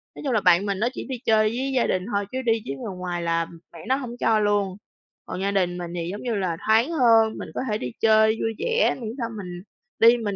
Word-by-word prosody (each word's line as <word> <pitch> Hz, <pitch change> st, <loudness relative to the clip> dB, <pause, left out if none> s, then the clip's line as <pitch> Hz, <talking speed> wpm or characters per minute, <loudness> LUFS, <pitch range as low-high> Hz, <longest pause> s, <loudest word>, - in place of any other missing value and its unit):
Nói -, -, -9 dB
chung 265 Hz, -, 0 dB
là 215 Hz, -, +2 dB
bạn 180 Hz, +2 st, +4 dB
mình 200 Hz, -2 st, -2 dB
nó 235 Hz, -, +2 dB
chỉ -, -, -6 dB
đi 260 Hz, -, -3 dB
chơi 215 Hz, -1 st, +4 dB
với 260 Hz, +4 st, -2 dB
gia 250 Hz, -, +2 dB
đình 185 Hz, -, 0 dB
thôi 200 Hz, 0 st, 0 dB
chứ 260 Hz, -, -2 dB
đi 225 Hz, -3 st, +1 dB
với 135 Hz, -, -4 dB
người 185 Hz, +8 st, -6 dB
ngoài 180 Hz, -1 st, -3 dB
là, 165 Hz, 0 st, +1 dB
ừm, 165 Hz, 0 st, -12 dB
mẹ 170 Hz, -, -11 dB
nó 260 Hz, -, +3 dB
hổng 250 Hz, -3 st, -6 dB
cho 220 Hz, -1 st, +3 dB
luôn. 205 Hz, -2 st, +1 dB, 0.5 s
Còn 185 Hz, -, -5 dB
gia 200 Hz, +1 st, 0 dB
đình 180 Hz, -3 st, 0 dB
mình 175 Hz, -1 st, -6 dB
thì 170 Hz, -1 st, -3 dB
giống 205 Hz, -, -6 dB
như 240 Hz, -3 st, -1 dB
là 185 Hz, -5 st, -1 dB
thoáng 225 Hz, +7 st, +4 dB
hơn, 230 Hz, -7 st, +4 dB
mình -, -, -7 dB
có -, -, -1 dB
thể 210 Hz, -, +1 dB
đi 125 Hz, -, -5 dB
chơi 220 Hz, 0 st, +4 dB
vui 225 Hz, -, -1 dB
vẻ 475 Hz, 0 st, +2 dB
miễn 220 Hz, -, -4 dB
sao 235 Hz, -3 st, -3 dB
mình 180 Hz, -3 st, -7 dB, 0.4 s
đi 230 Hz, +2 st, +7 dB
mình 210 Hz, -4 st, -3 dB
215 Hz, 270 wpm, -24 LUFS, 185-230 Hz, 0.5 s, đi